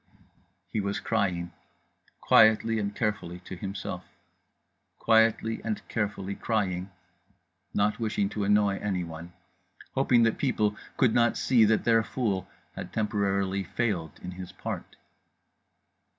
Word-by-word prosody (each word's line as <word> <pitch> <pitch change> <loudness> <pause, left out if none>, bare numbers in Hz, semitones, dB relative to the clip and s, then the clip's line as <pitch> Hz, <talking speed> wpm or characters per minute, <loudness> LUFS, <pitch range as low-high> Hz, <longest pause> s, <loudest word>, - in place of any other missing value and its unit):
_" - - -26 0.5
He 110 - 0
was 100 0 -2
crying, 90 -6 -1 0.7
quietly 110 +1 +5
and 100 -1 -3
carefully, 105 -6 -2
to 95 - -8
himself… 95 +1 -5 0.9
quietly 115 0 +3
and 110 -2 -3
carefully 100 -3 -2
crying, 95 -4 -1 0.9
not 105 +1 +1
wishing 110 -3 0
to 105 0 -3
annoy 100 -1 +3
anyone… 85 -4 -4 0.6
hoping 125 -3 +4
that 115 -1 +1
people 105 -6 +1 0.2
could 120 -4 +4
not 120 -1 +3
see 120 -4 +4
that 110 0 +2
Their 115 -1 +4
Fool 105 -7 -2 0.3
had - - -7
temporarily 100 -3 0
failed 90 -6 -2
in 90 - -5
his 90 0 -8
part. - - -6
105 Hz, 120 wpm, -28 LUFS, 95-110 Hz, 0.9 s, quietly